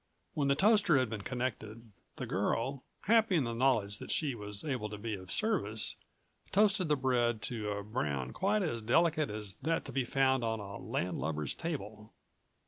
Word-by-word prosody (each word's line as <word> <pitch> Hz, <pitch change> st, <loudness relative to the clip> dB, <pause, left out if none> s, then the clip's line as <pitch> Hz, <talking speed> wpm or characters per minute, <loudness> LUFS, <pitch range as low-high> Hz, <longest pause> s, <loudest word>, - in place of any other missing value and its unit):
When 145 Hz, -2 st, 0 dB
the 140 Hz, -, +4 dB
toaster 200 Hz, -2 st, +5 dB
had 130 Hz, -4 st, +1 dB
been 110 Hz, -2 st, -3 dB
connected, 115 Hz, -2 st, -4 dB, 0.2 s
the -, -, -4 dB
girl, 115 Hz, +8 st, -1 dB, 0.2 s
happy 220 Hz, -2 st, +4 dB
in 155 Hz, -, +3 dB
the 115 Hz, -1 st, -2 dB
knowledge 115 Hz, -5 st, +2 dB
that -, -, -8 dB
she 150 Hz, -4 st, +1 dB
was 105 Hz, -3 st, -5 dB
able 125 Hz, -8 st, -2 dB
to 105 Hz, -, -6 dB
be 110 Hz, +1 st, -4 dB
of 95 Hz, -2 st, -7 dB
service, 135 Hz, -, 0 dB, 0.6 s
toasted 205 Hz, -2 st, +3 dB
the 150 Hz, -, +3 dB
bread 120 Hz, -4 st, +1 dB
to 110 Hz, -4 st, -3 dB
a 100 Hz, 0 st, -3 dB
brown 70 Hz, -, -2 dB
quite 205 Hz, +1 st, +1 dB
as 120 Hz, -10 st, -2 dB
delicate 155 Hz, +6 st, +3 dB
as 105 Hz, -2 st, -4 dB
that 165 Hz, +1 st, -1 dB
to 135 Hz, -, -6 dB
be 130 Hz, +1 st, 0 dB
found 130 Hz, 0 st, +2 dB
on 110 Hz, -1 st, -1 dB
a 100 Hz, 0 st, -7 dB
landlubber's 80 Hz, -4 st, -2 dB
table. 110 Hz, -10 st, -5 dB
120 Hz, 180 wpm, -33 LUFS, 105-150 Hz, 0.6 s, toaster